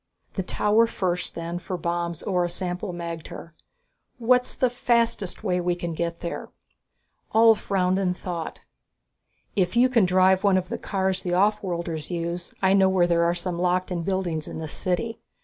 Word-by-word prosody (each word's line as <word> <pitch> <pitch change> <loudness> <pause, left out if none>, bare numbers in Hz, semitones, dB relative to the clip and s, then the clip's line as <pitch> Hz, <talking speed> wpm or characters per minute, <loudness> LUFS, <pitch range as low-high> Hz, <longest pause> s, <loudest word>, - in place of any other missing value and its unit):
"The 190 - -1
tower 210 +4 +2
first 180 -5 -2
then, 170 +1 -4
for 180 +1 -4
bombs 170 -1 -2
or 180 -2 +1
a 175 - -1
sample 180 +2 -4
magter. 170 -1 -7 0.7
What's 250 +1 +2
the 255 -2 +2
fastest 235 -5 0
way 180 -4 +1
we 175 0 0
can 170 -1 -4
get 170 +1 -3
there?" 170 - -5 0.9
Ulv 225 0 +7
frowned 190 -2 +1
in 180 -2 0
thought. 175 -3 -5 0.9
"If 185 -2 +1
you 250 +2 +5
can 230 -6 +4
drive 185 +1 +4
one 200 -2 +4
of 185 0 -2
the - - -3
cars 190 -1 -1
the 175 -1 -1
offworlders 180 -5 0
use, 170 0 -3
I 190 0 +5
know 190 -1 +5
where 185 -2 +3
there 170 -1 +2
are 170 +1 +2
some 175 0 -3
locked 180 +1 +1
in 175 -2 -1
buildings 175 -4 -2
in - - -6
this 160 -1 -5
city. 225 +6 -2
180 Hz, 175 wpm, -25 LUFS, 175-195 Hz, 0.9 s, Ulv